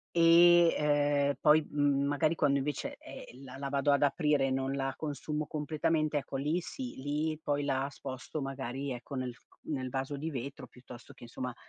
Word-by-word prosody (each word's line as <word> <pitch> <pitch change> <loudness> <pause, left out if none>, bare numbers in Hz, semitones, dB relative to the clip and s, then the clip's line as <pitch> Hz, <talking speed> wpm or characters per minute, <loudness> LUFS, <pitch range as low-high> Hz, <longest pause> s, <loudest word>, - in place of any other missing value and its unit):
e, 170 0 +7
ehm, 145 -1 +2
poi 155 0 +5
m 145 -1 +2
magari 155 +3 +1
quando 140 -3 +2
invece, 145 0 -3
ehm, 130 +3 -11
la 130 0 -10
la 140 - -4
vado 140 +1 +2
ad 140 - +2
aprire 145 -1 +2
e - - -1
non 135 +1 -1
la 135 -1 -1
consumo 150 0 -4
completamente 155 0 -1
ecco 140 -1 -3
lì 150 +6 0
sì, 250 +8 -7
lì 150 +3 -2
poi 145 -2 -1
la 135 -1 0
sposto 135 +2 -6
magari 135 0 -4
ecco 125 +3 -8
nel 130 -2 -3
f 120 - -22 0.2
nel 130 -4 -3
vaso 135 +2 -3
di 155 +4 -4
vetro 140 +1 -6
piuttosto 125 -1 -13
che - - -14
insomma, 125 +1 -5
145 Hz, 185 wpm, -31 LUFS, 135-150 Hz, 0.2 s, e